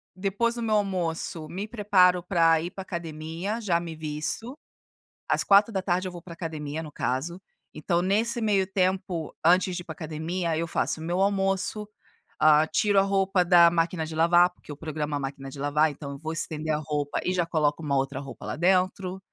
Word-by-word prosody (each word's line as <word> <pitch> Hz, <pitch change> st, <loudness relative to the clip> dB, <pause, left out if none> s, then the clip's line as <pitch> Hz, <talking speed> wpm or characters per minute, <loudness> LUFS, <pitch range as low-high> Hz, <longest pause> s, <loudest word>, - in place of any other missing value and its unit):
Depois 205 Hz, +5 st, 0 dB
do 240 Hz, -, -3 dB
meu 220 Hz, -2 st, +1 dB
almoço, 175 Hz, -5 st, -1 dB
me 195 Hz, +6 st, -5 dB
preparo 195 Hz, -5 st, +3 dB
para 165 Hz, -2 st, +3 dB
ir 175 Hz, -, -5 dB
para 190 Hz, -, -7 dB
a -, -, -7 dB
academia, 170 Hz, +5 st, -5 dB
já 175 Hz, -5 st, +1 dB
me 170 Hz, -1 st, -6 dB
visto. 155 Hz, -, -4 dB, 0.7 s
Às -, -, +2 dB
16h, 195 Hz, -3 st, +3 dB
eu -, -, -5 dB
vou 175 Hz, -1 st, -9 dB
pra 170 Hz, 0 st, -10 dB
academia, 160 Hz, -2 st, -5 dB
no 155 Hz, -, -9 dB
caso. 150 Hz, +7 st, -3 dB, 0.3 s
Então 170 Hz, +3 st, 0 dB
nesse 220 Hz, +6 st, +1 dB
meio 205 Hz, -3 st, +2 dB
tempo, 185 Hz, -3 st, -1 dB
antes 180 Hz, +2 st, +4 dB
de 175 Hz, -, -4 dB
ir -, -, -13 dB
pra 165 Hz, -, -6 dB
academia, 160 Hz, +2 st, -3 dB
eu 165 Hz, +1 st, -1 dB
faço 160 Hz, -, -1 dB
o -, -, -6 dB
meu 175 Hz, +3 st, -1 dB
almoço, 195 Hz, +1 st, 0 dB, 0.5 s
ah, 155 Hz, 0 st, +5 dB
tiro 205 Hz, +4 st, +2 dB
a -, -, +6 dB
roupa 195 Hz, -1 st, +2 dB
da 175 Hz, -1 st, +7 dB
máquina 165 Hz, -1 st, 0 dB
de 160 Hz, 0 st, -7 dB
lavar, 175 Hz, +2 st, +5 dB
porque 175 Hz, -, -14 dB
eu 145 Hz, -, -8 dB
programo 150 Hz, -1 st, -3 dB
a -, -, -1 dB
máquina 135 Hz, 0 st, -6 dB
de 135 Hz, -, -10 dB
lavar, 150 Hz, +2 st, +2 dB
então 140 Hz, 0 st, -8 dB
eu 140 Hz, -, -7 dB
vou 160 Hz, +2 st, -5 dB
estender 155 Hz, -1 st, -2 dB
a -, -, +1 dB
roupa, 150 Hz, -1 st, -2 dB
e 180 Hz, -, 0 dB
já 175 Hz, -2 st, +1 dB
coloco 155 Hz, -2 st, 0 dB
uma 145 Hz, -2 st, 0 dB
outra 135 Hz, 0 st, -1 dB
roupa 135 Hz, -1 st, -9 dB
lá -, -, -3 dB
dentro. 185 Hz, +2 st, +1 dB
170 Hz, 200 wpm, -26 LUFS, 155-190 Hz, 0.7 s, da